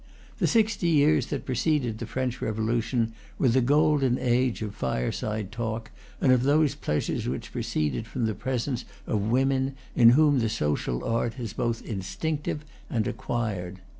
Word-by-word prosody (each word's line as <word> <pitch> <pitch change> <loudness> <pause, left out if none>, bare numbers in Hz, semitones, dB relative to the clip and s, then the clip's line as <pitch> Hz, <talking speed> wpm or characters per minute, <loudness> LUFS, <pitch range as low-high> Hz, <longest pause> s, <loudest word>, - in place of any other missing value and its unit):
The - - +3
sixty 220 -5 +2
years 155 -1 +4
that 145 - -4
preceded 130 -3 0
the 115 - -5
French 130 -1 -2
Revolution 115 +1 0 0.2
were 130 - +3
the 130 +3 +3
golden 145 -1 +3
age 125 -2 +1
of 105 -2 -4
fireside 95 - -2
talk 115 -1 -4 0.3
and 130 - +4
of 125 -1 +5
those 145 +1 +3
pleasures 75 - -2
which - - -5
proceed 75 +9 -2
from 120 -1 -2
the 110 - 0
presence 125 +1 -2 0.2
of 105 - 0
women 135 +2 +1 0.2
in 115 -1 +8
whom 150 -3 +5
the 115 -2 +1
social 75 - -1
art 115 +2 -1
is 115 -3 -4
both 115 -1 -1
instinctive 150 - -3 0.2
and 110 -3 0
acquired. 95 -6 -3
120 Hz, 155 wpm, -27 LUFS, 110-135 Hz, 0.3 s, in